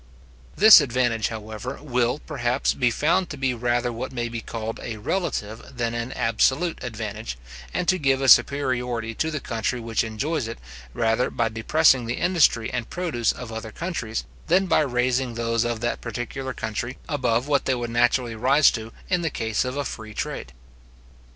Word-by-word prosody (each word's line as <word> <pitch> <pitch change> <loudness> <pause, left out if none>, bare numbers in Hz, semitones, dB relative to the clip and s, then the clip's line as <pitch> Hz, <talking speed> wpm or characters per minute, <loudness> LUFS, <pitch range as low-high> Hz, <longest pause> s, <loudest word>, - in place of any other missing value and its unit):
This 215 +2 +9
advantage, 120 -4 0
however, 110 +3 -6
will, 125 -3 0
perhaps, 130 -4 -1
be 125 -3 +2
found 170 +9 +1
to 150 - -6
be 135 -1 0
rather 120 0 0
what 125 +3 -5
may 120 -2 -3
be 115 -1 -5
called 115 0 -5
a 115 -2 -5
relative 110 - -2 0.2
than 120 -1 -1
an 120 +2 -3
absolute 130 +9 +1
advantage, 110 - -5 0.3
and 175 - -2
to 185 -1 +3
give 135 -3 +2
a 135 - 0
superiority 125 -4 +3
to 160 +8 -1
the 155 -2 -3
country 120 0 -2
which 115 -1 -1
enjoys 120 +5 -2
it, 115 - -6 0.4
rather 115 +2 +1
by 115 -1 0
depressing 125 +3 +3
the 120 - -1
industry 155 -10 +2
and 120 -2 -3
produce 160 -11 0
of 125 -3 -8
other 110 0 -6
countries, 140 - -4 0.2
than 185 +3 +4
by - - +3
raising 125 -3 0
those 115 0 0
of 120 -2 -2
that 120 - -2
particular 120 +3 -4
country 120 +2 -4
above 125 -4 0
what 145 -1 +1
they 130 - +2
would 120 -1 -4
naturally 120 0 +2
rise 135 +6 +4
to 110 0 -6 0.2
in 180 -2 +1
the 165 - 0
case 110 -5 -1
of 130 +1 -4
a 145 - -1
free 110 -3 -7
trade. - - -4
120 Hz, 175 wpm, -24 LUFS, 115-140 Hz, 0.4 s, This